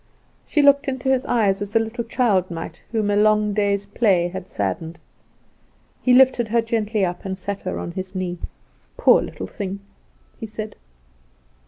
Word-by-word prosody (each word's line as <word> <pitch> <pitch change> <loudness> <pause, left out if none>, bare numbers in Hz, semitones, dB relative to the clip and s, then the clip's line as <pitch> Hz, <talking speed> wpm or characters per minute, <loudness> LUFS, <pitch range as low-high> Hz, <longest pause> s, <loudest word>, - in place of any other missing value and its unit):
She 295 - +2
looked 280 +1 +5
into 265 0 -2
his 265 -1 +1
eyes 205 -4 +2
as 205 +1 -5
a - - +6
little 225 +2 -3
child 220 -6 +1
might 165 -2 -7
whom 215 -3 0
a - - +2
long 210 0 +3
day's 200 -1 +1
play 200 -4 +2
had 185 0 -7
saddened. 105 - -3 1.0
He 255 - +2
lifted 250 -2 +5
her 230 +1 +2
gently 220 -3 0
up, 175 0 -4
and 190 -1 -4
sat 200 +1 -4
her 185 - -4
on - - -5
his 185 +1 -6
knee. 180 -2 -3 0.6
"Poor - - +5
little - - -6
thing!" 200 -2 -5 0.6
he 225 - -5
said. 215 0 -6
205 Hz, 170 wpm, -22 LUFS, 190-230 Hz, 1.0 s, a